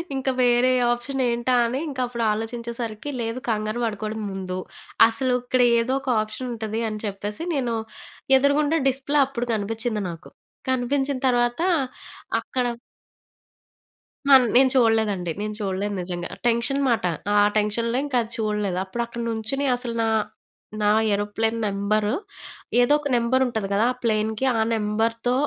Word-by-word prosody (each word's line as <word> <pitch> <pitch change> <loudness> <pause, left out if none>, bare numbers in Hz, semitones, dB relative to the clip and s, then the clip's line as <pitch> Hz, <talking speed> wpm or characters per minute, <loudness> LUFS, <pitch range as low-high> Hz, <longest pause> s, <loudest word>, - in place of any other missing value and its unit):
ఇంకా 265 0 0
వేరే 245 +1 +4 0.2
ఆప్షన్ 260 +3 -2
ఏంటా 235 +2 0
అని 250 +4 -1
ఇంకా 270 -3 -4
అప్పుడు 235 -1 -3
ఆలోచించేసరికి, 230 +2 -4
లేదు 230 +2 -3
కంగారు 215 +1 -1
పడుకూడదు 215 0 -3
ముందు. 185 -1 -4 0.5
అసలు 250 +3 0
ఇక్కడ 250 +1 +1 0.2
ఏదో 250 +3 0
ఒక 270 - -5
ఆప్షన్ 215 +4 -5
ఉంటదని 220 -1 -3
చెప్పేసి, 205 +5 -5
నేను 245 -4 0 0.6
ఎదురుగుండా 290 +3 +2
డిస్‌ప్లే 270 +2 +1
అప్పుడు 245 -2 -4
కనిపించింది 220 +1 -2
నాకు. 165 0 -9 0.4
కనిపించిన 270 +2 0
తర్వాత 240 +3 +1 0.8
అక్కడ 255 -2 -2 1.6
నేను 260 0 +6
చూడలేదండి, 220 -7 +2
నేను 215 0 -3
చూడలేదు. 200 +1 -2
నిజంగా. 175 -1 -5 0.2
టెన్షన్ 240 +4 +1
మాట. 230 -6 +1 0.3
ఆ - - +5 0.2
టెన్షన్‌లో 230 +3 0
ఇంకా 265 -4 0
అది 225 - -12
చూడలేదు. 210 -4 -1
అప్పుడు 235 +5 -4
అక్కడ 235 0 -7
నుంచొని 225 +5 -1
అసలు 240 -2 -4
నా 225 - +1 0.7
నా 210 - +3 0.2
ఏరోప్లేన్ 215 +3 -1
నంబర్, 205 +1 0 0.8
ఏదో 245 +4 +4
ఒక 290 - -3
నంబర్ 240 +2 +2
ఉంటది 220 -5 -2
కదా! 210 +4 +3
ఆ - - -17
ప్లేన్‌కి. 220 +2 0
ఆ - - +1
నంబర్‌తో 225 +3 0
230 Hz, 135 wpm, -24 LUFS, 215-255 Hz, 1.6 s, నేను